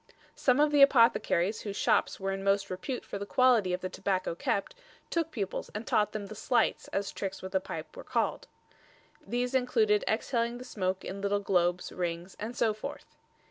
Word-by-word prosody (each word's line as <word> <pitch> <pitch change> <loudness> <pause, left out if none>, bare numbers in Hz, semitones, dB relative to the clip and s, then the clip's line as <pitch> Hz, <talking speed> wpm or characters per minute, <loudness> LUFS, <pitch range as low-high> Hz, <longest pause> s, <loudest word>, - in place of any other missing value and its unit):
Some 255 +1 +2
of 300 0 +4
the 290 -1 +4
apothecaries 230 -7 +4
whose 205 -2 -5
shops - - +1
were 195 0 -1
in 195 0 -4
most 195 0 +1
repute 240 +8 -4
for 200 - -5
the 200 - -4
quality 245 -7 +4
of 180 +1 -1
the 185 - -2
tobacco 185 -1 -1
kept, 195 - -1 0.4
took 330 -2 0
pupils 205 -11 -4
and 215 +2 -4
taught 210 -1 +2
them 210 -2 -4
the 200 - -8
"slights," 235 +3 +1
as 195 0 -2
tricks 195 -1 -5
with 190 - -6
the 190 - +2
pipe 185 - -7
were - - -8
called. - - -1 0.8
These 245 +1 -2
included 420 - +3
exhaling 235 -1 0
the 250 - -8
smoke 190 -5 -2
in 195 +1 -5
little 200 0 +1
globes, 180 -3 +1
rings 175 0 -4
and 230 +4 -5
so 220 -2 +2
forth. 245 +7 -8
205 Hz, 190 wpm, -30 LUFS, 190-250 Hz, 0.8 s, of